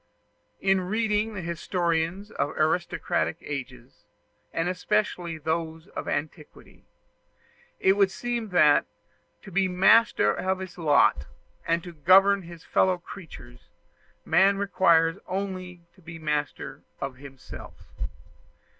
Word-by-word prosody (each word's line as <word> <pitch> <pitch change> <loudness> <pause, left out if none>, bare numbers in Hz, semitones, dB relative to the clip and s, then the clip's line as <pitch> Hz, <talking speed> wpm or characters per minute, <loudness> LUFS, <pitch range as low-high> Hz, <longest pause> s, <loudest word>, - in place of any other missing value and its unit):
In 195 -1 +3
reading 215 +2 0
the 190 - -5
historians 170 +3 -1
of 145 - -3
aristocratic 170 +1 0
ages, 130 -3 -8 0.5
and 165 +1 -1
especially 180 -2 -1
those 160 +2 -3
of - - -6
antiquity, 150 0 -6 0.9
it 190 - +4
would 200 -1 +3
seem 240 +1 -3
that, 155 -5 +4 0.6
to 195 - -11
be 190 +1 +2
master 195 +5 +4
of 190 0 -1
his 185 -1 -8
lot, 145 - +3 0.4
and 165 0 +1
to 175 - -9
govern 195 +6 +5
his 170 -2 -12
fellow 185 -1 +2
creatures, 160 -9 -12 0.6
man 195 +1 +4
requires 175 -3 +3
only 185 -2 -4
to 185 - -22
be 165 -1 -9
master 150 -2 -3 0.2
of 135 -2 -5
himself. 135 -1 -11
175 Hz, 115 wpm, -26 LUFS, 160-195 Hz, 0.9 s, govern